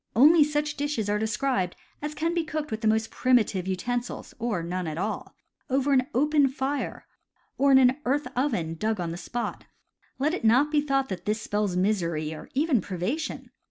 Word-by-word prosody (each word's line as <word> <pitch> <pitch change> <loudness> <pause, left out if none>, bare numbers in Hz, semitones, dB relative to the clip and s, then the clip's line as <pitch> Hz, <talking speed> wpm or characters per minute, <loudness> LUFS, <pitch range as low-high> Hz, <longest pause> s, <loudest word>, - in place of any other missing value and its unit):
Only 300 +7 +7
such 295 0 -1
dishes 280 -8 -1
are 210 - +1
described 220 -3 0 0.3
as 300 +1 -4
can 330 +3 0
be 340 -1 +1
cooked 310 -2 -4
with 220 0 -3
the 220 - +1
most 220 +1 +1
primitive 215 -7 +2
utensils 240 +6 -3
(or 220 -7 -1
none 180 +1 -3
at 155 0 -4
all) 205 +5 -3 0.3
over 270 +2 +2
an 255 -1 +3
open 295 +1 +4
fire, 270 +1 -3 0.5
or 280 0 +4
in 265 - +8
an 260 0 +5
earth 285 +4 0
oven 230 - 0
dug 215 +5 -1
on 170 -2 -2
the - - -4
spot. 235 +6 -4 0.5
Let 295 +5 +1
it 365 - -3
not 255 +7 +4
be 300 -1 +3
thought 275 -2 0
that 180 -2 -5
this 215 +1 0
spells 205 -3 -1
misery, 170 -6 0
or 155 - -10
even 280 -5 +2
privation. 205 - -4
245 Hz, 190 wpm, -26 LUFS, 200-290 Hz, 0.5 s, in